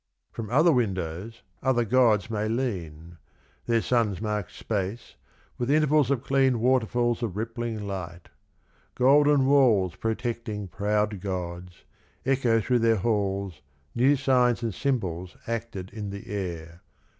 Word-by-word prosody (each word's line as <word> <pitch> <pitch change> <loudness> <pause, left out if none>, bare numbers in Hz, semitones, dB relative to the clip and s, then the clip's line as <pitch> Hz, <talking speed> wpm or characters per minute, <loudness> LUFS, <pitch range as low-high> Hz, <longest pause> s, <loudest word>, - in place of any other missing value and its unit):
From 110 -3 -6
other 155 +8 +4
windows, 100 - -2 0.2
other 125 -3 +2
gods 115 -4 +3
may 105 -1 -1
lean, 85 -9 -4 0.5
Their 115 -1 +2
sons 115 -7 +1
mark 105 -2 -2
space 105 +1 -4 0.5
with 120 +1 -1
intervals 150 -2 +3
of 135 -3 0
clean 135 -3 +2
Waterfalls 120 -1 +1
of 105 -5 -3
rippling 115 -1 -4
light, 90 -3 -6 0.7
golden 145 +2 +4
walls 120 -10 +4
Protecting 115 -2 -3
proud 105 +1 -1
gods, 90 -2 -5 0.4
echo 130 -4 +2
through 125 +3 +1
their 115 0 +3
halls 100 -5 -1 0.3
New 130 +5 +4
signs 125 -3 +2
and 115 -3 -2
symbols 95 -8 -2
acted 115 -5 -4
in 105 -1 -6
the 100 0 -8
air. 85 -4 -5
110 Hz, 125 wpm, -26 LUFS, 95-125 Hz, 0.7 s, other